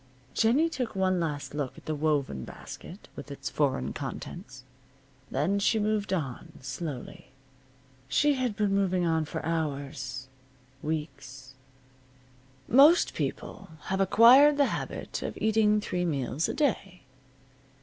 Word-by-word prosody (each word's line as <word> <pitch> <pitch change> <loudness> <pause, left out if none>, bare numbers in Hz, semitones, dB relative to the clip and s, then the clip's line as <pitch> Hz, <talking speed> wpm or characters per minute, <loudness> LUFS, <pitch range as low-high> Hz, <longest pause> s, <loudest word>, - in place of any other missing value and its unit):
Jennie 250 +9 +3
took 250 -9 -4
one 185 -1 +1
last 150 -4 -3
look 145 -3 -4
at - - -14
the 155 - -2
woven 145 - -1
basket - - -10
with - - -9
its - - -6
foreign 65 +1 0
contents. 125 +1 -7 0.7
Then 165 +10 0
she 220 +3 +2
moved 210 -1 0
on, 145 -10 -3
slowly. 135 0 -6 0.8
She 295 - +3
had 255 -5 -1
been 205 -2 +1
moving 185 -3 +1
on 160 -1 +1
for - - -5
hours 140 -5 -3 0.5
weeks. 135 -4 -5 1.1
Most 290 +8 +6
people - - -5 0.2
have 190 0 +1
acquired 250 +9 +7
the 285 - +5
habit - - -5
of - - -5
eating 215 -1 +3
three 180 -3 -2
meals 145 -1 -1
a - - -3
day. 195 - -1
175 Hz, 130 wpm, -28 LUFS, 140-215 Hz, 1.1 s, acquired